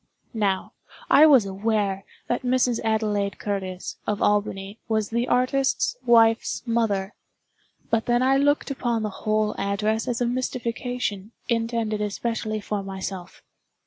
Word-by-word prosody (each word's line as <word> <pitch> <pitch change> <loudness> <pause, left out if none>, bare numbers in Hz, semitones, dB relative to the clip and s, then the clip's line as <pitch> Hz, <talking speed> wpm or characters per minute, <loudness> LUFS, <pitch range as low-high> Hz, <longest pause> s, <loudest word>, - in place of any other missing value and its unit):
Now, 200 -4 -1 0.4
I 305 +2 +8
was 265 -8 +6
aware 195 0 -1 0.2
that 240 - -1
Mrs. 250 -2 +1
Adelaide 210 -3 0
Curtis, 190 -3 -4
of 210 -1 0
Albany, 205 0 0
was 220 -2 0
the 235 +2 0
artist's 265 - +1
wife's 230 -1 +4
mother,—but 225 0 -3
then 240 +1 +3
I 265 +1 +4
looked 290 +1 +2
upon 240 -4 -1
the 210 - -2
whole 215 +1 0
address 210 +4 0
as 245 -2 -1
a 245 - +1
mystification, 240 -3 -3 0.2
intended 230 -2 0
especially 215 +1 -2
for 205 0 -3
myself. 190 -1 -7
220 Hz, 125 wpm, -24 LUFS, 205-240 Hz, 0.4 s, I